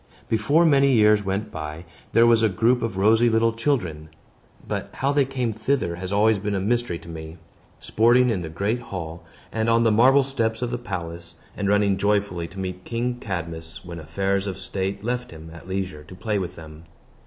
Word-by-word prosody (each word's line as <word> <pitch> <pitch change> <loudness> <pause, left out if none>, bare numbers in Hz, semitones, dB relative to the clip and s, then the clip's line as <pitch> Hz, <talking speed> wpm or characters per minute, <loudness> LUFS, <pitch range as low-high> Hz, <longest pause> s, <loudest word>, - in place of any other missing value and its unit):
Before 140 +10 +3
many 140 -3 +4
years 105 -2 +5
went 100 +2 -2
by, 80 +1 -6 0.3
there 115 - +5
was 115 -1 +5
a 110 - +4
group 115 +5 +2
of 110 -4 -3
rosy 110 +4 +4
little 115 0 +2
children 95 - -1 0.6
(but - - -3
how 135 +2 0
they 145 -1 +3
came 125 -4 -2
thither 110 -6 -1
has 90 +1 -5
always 105 +1 +3
been 105 0 -2
a - - 0
mystery 120 -2 0
to 85 - -15
me) 80 0 -8 0.4
sporting 120 +3 +3
in 95 -5 -1
the 80 - -5
great 100 +9 -1
hall, 85 -6 -7 0.3
and 110 0 0
on 115 0 +4
the 115 - +4
marble 130 +6 +5
steps 115 -4 -1
of 120 - -2
the 120 - -2
palace, 85 -6 -6 0.2
and 100 - -2
running 100 -1 +3
joyfully 100 -4 0
to 90 - -14
meet 90 -1 -5
King 120 +1 -2
Cadmus 85 -3 -6
when 85 -1 -7
affairs 95 +5 -1
of 95 - -4
state 95 +1 -3
left 125 +2 -2
him 80 0 -11
at 85 - -12
leisure 95 -5 -4
to 90 - -12
play 105 +2 -1
with 90 -2 -5
them. 80 0 -12
100 Hz, 200 wpm, -24 LUFS, 85-115 Hz, 0.6 s, years